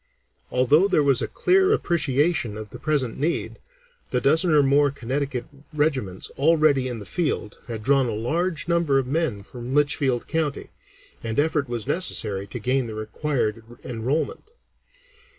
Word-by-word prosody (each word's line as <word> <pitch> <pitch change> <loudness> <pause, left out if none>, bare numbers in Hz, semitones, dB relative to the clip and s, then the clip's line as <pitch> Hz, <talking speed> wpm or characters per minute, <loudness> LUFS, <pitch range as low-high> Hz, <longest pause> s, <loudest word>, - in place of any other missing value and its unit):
Although 145 +9 +4
there 170 -6 +2
was 135 -3 +3
a - - -1
clear 380 +2 +3
appreciation 150 - +1
of 110 -1 -8
the - - -9
present 145 -6 -1
need, 160 +5 -2 0.5
the 125 - 0
dozen 160 +7 +3
or 150 -2 +5
more 140 +1 +4
Connecticut 135 -1 -3 0.3
regiments 140 - -1
already 150 -3 +3
in 125 -2 -4
the 105 - -9
field 145 - -2
had 115 -3 -5
drawn 135 +1 +3
a - - -2
large 160 +10 -1
number 170 -5 +2
of 135 - +1
men 135 -7 -1
from 125 +4 -6
Litchfield 135 -4 +1
County, 155 -4 -2 0.5
and 115 +1 -2
effort 150 -3 +1
was 120 -3 -2
necessary 105 - +1
to 110 - -6
gain 125 +2 0
the 110 - -7
required 110 0 -2 0.2
enrollment. 125 +6 -2
135 Hz, 150 wpm, -24 LUFS, 120-155 Hz, 0.5 s, or